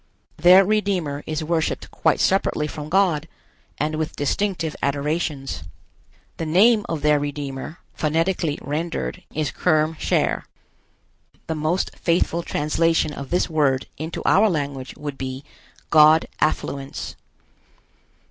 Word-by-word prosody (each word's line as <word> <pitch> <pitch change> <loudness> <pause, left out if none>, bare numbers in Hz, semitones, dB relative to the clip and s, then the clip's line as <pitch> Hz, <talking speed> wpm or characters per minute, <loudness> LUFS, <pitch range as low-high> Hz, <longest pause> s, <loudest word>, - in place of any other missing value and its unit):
Their 180 +4 +7
Redeemer 185 -9 0
is 155 0 -2
worshiped 160 0 -1
quite - - +1
separately 190 -5 +2
from 150 0 -6
God, 170 -5 +2 0.5
and 150 +2 -1
with 155 -1 -3
distinctive 165 +2 -1
adorations. 140 - -2 0.8
The 165 - -3
name 210 +6 +4
of 160 -3 -3
their 150 -1 +4
Redeemer, 145 +1 -5 0.2
phonetically 165 0 0
rendered, 160 +4 -3
is 155 -2 -2
Kerm 155 -2 +1
Cher. - - 0 1.0
The 160 - -2
most 155 +4 -1
faithful 170 0 +1
translation 165 0 +1
of 140 -2 -7
this 180 - +1
word 145 -5 +1
into 160 +3 -5
our 215 +3 +5
language 140 -6 -3
would 145 -2 -6
be 130 +1 -5 0.5
God 155 +1 +7
affluence. 140 -2 -2
155 Hz, 120 wpm, -22 LUFS, 145-170 Hz, 1.0 s, Their